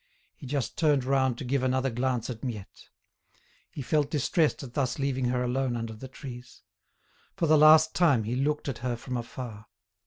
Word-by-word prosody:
He 135 - -11
just 140 -1 -3
turned 150 -5 +3
round 130 -2 +1
to 130 - -6
give 135 +2 0
another 130 0 0
glance 125 0 -1
at 115 0 -9
Miette. 110 -7 -7 0.8
He 140 - -7
felt 150 +2 +1
distressed 150 +1 +1
at 125 -3 -9
thus 130 -2 -1
leaving 135 -2 -1
her 125 0 0
alone 125 0 -1
under 115 -1 -4
the 110 +5 -9
trees. 125 -2 -11 0.7
For 170 - 0
the 155 0 +5
last 155 +1 +7
time 140 -10 +3
he 115 +4 -2
looked 150 +3 -1
at 130 -4 -3
her 120 0 -2
from 125 +2 -6
afar. 115 -2 -7
130 Hz, 185 wpm, -28 LUFS, 120-140 Hz, 0.8 s, last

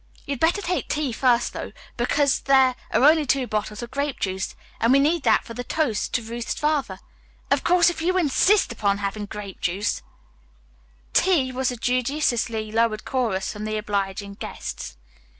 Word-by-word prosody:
"You'd 280 -3 -3
better 345 +5 +2
take 360 0 -1
tea 295 -3 -1
first, 245 0 +2
though, - - -6 0.2
because 275 +3 +2
there 265 -2 +4 0.2
are - - +2
only 310 +2 +6
two 270 -1 +1
bottles 215 0 -3
of 235 - -8
grape 280 0 -2
juice, 190 0 -3 0.2
and 230 - +3
we 270 - +6
need 305 +4 +2
that 225 -4 +3
for 230 - -8
the 245 +2 -5
toast 245 -7 -1
to 235 - 0
Ruth's 230 +1 -4
father. 290 -10 0 0.5
Of - - +2
course 350 0 +5
if 340 - -7
you 365 +3 +1
insist 370 - +3
upon 200 -3 0
having 205 +1 -4
grape 200 -2 -8
juice 190 +4 -1 0.6
" - - -33
"Tea," 325 -9 +3
was 255 0 0
the 245 - -4
judiciously 240 -3 0
lowered 225 -1 +1
chorus 225 -8 -1
from 210 0 -7
the 215 0 -2
obliging 200 -1 -3
guests. 60 - -7
240 Hz, 175 wpm, -24 LUFS, 210-285 Hz, 0.6 s, only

